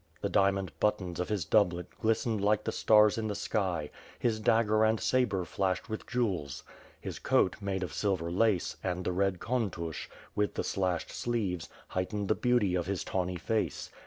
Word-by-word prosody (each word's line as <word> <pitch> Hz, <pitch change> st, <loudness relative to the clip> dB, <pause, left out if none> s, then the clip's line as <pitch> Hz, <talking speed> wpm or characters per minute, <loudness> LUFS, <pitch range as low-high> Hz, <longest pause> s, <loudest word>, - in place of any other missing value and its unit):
The -, -, -1 dB
diamond 95 Hz, -3 st, +2 dB
buttons 95 Hz, -5 st, 0 dB
of 90 Hz, -, -2 dB
his 100 Hz, -6 st, -1 dB
doublet 90 Hz, -1 st, +2 dB, 0.2 s
glistened 110 Hz, -1 st, +1 dB
like 105 Hz, +1 st, +3 dB
the -, -, -1 dB
stars 105 Hz, 0 st, +5 dB
in 110 Hz, -, -2 dB
the 105 Hz, -, -2 dB
sky; 90 Hz, -9 st, -1 dB, 0.3 s
his 115 Hz, -2 st, 0 dB
dagger 110 Hz, -1 st, +3 dB
and 110 Hz, 0 st, +3 dB
sabre 105 Hz, -8 st, +1 dB
flashed 95 Hz, 0 st, -1 dB
with 110 Hz, -, -5 dB
jewels. 95 Hz, -, -1 dB, 0.4 s
His -, -, -6 dB
coat, -, -, +2 dB
made 95 Hz, -1 st, -2 dB
of 90 Hz, -, -5 dB
silver 95 Hz, -5 st, -1 dB
lace, 100 Hz, -1 st, +1 dB
and 90 Hz, -1 st, -2 dB
the -, -, +1 dB
red 95 Hz, +1 st, +1 dB
Kontush, 95 Hz, -, -2 dB, 0.3 s
A^ath 105 Hz, 0 st, 0 dB
the -, -, -1 dB
slashed 90 Hz, -3 st, -1 dB
sleeves, 100 Hz, -8 st, -2 dB, 0.2 s
heightened 100 Hz, +2 st, -2 dB
the -, -, +5 dB
beauty 120 Hz, -6 st, +2 dB
of 90 Hz, -1 st, 0 dB
his 100 Hz, -2 st, -2 dB
tawny 90 Hz, -1 st, -2 dB
face. 105 Hz, -, -2 dB
100 Hz, 175 wpm, -30 LUFS, 90-110 Hz, 0.4 s, stars